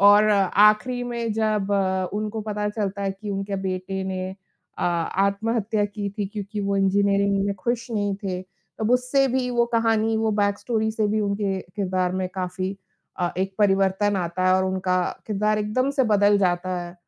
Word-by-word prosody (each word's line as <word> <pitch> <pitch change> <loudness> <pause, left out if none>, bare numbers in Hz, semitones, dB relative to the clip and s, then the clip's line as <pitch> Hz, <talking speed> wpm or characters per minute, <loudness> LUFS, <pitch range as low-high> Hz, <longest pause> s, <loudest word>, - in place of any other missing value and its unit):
और 205 +1 +7
आख़िरी 210 +5 +4
में 235 -2 -2
जब 215 -2 0
अ, 190 -2 +1
उनको 215 +1 -3
पता 210 -1 -2
चलता 200 -2 -3
है 195 - 0
कि 205 +2 -7
उनके 195 0 -3
बेटे 185 +1 -3
ने 185 0 -3 0.5
अ, - - -1
आत्महत्या 200 +5 0
की 205 0 -4
थी 205 - 0
क्योंकि 205 0 -5
वो 200 0 0
इंजीनियरिंग 200 0 +2
में 200 - -1
खुश 235 +4 -2
नहीं 205 -2 0
थे, 185 -1 -2
तो 195 +3 -8
उससे 250 +2 +2
भी 255 0 0
वो 240 -1 +2
कहानी 225 -1 +2
वो 220 0 +1
बैक 200 0 +1
स्टोरी 220 -2 -1
से 215 -1 0
भी 215 +1 +1
उनके 200 -2 -1 0.2
किरदार 185 -2 0
में 185 0 -2
काफ़ी 185 +1 -3 0.4
अ, 175 -1 +1
एक 190 +1 -1
परिवर्तन 195 0 +2
आता 185 0 -1
है 185 - +5
और 190 - +1
उनका 185 -1 0 0.3
किरदार 210 +1 +1
एकदम 235 +6 0
से - - +4
बदल 205 0 +4
जाता 180 -1 0
है। 175 0 -9
200 Hz, 180 wpm, -24 LUFS, 190-215 Hz, 0.5 s, और